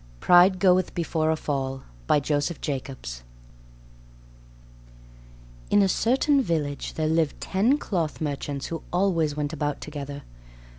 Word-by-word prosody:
PRIDE 180 +1 +6
GOETH 185 0 +3
BEFORE 160 -2 0
A 160 - +2
FALL 135 -3 -3 0.2
By - - +4
Joseph 145 +3 -1
Jacobs 130 - -5 2.5
In 205 - +5
a - - +3
certain 270 +8 +2
village 155 - -2
there 155 - -1
lived 160 -2 +1
ten 220 +9 +2
cloth 170 - -2
merchants 145 -2 -3
who 165 -1 -5
always 170 -5 +1
went 150 +1 -2
about 145 -1 -2
together. 145 -1 -7
155 Hz, 120 wpm, -25 LUFS, 145-180 Hz, 2.5 s, PRIDE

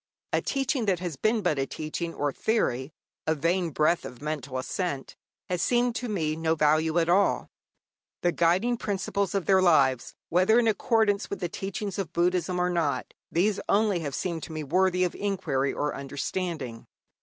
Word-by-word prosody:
A - - +3
teaching 270 -3 0
that 190 -2 +3
has 175 -3 -4
been 215 - +1
but 155 -6 +1
a 135 - 0
teaching 160 +2 -4
or 145 0 0
theory, 140 - 0 0.4
a 160 - +3
vain 170 +3 +1
breath 155 +3 +2
of 125 - -9
mental 145 -3 -4
assent, 140 +1 -3 0.3
has 180 -2 -1
seemed 245 +3 +2
to 245 - -4
me 160 -7 0
of 160 - -6
no 160 0 +1
value 155 +2 +2
at 165 -1 +3
all. 190 +4 +2 0.7
The 175 - +3
guiding 185 +9 +2
principles 200 -2 -2
of 195 -4 0
their 190 -1 +5
lives, 140 -8 +3
whether 185 +6 +4
in 240 -1 +4
accordance 215 -1 +2
with 200 - -4
the 175 - -2
teaching 195 +2 -4
of 175 -4 -4
Buddhism 180 +1 +1
or 180 0 +1
not, 165 -5 -1 0.2
these 195 +4 +2
only 205 -3 +3
have 145 -4 -4
seemed 170 -3 -2
to - - -7
me 155 -1 -4
worthy 180 +4 +2
of 180 - 0
inquiry 170 -10 -1
or 150 0 -2
understanding. 140 -2 -4
175 Hz, 180 wpm, -27 LUFS, 155-195 Hz, 0.7 s, their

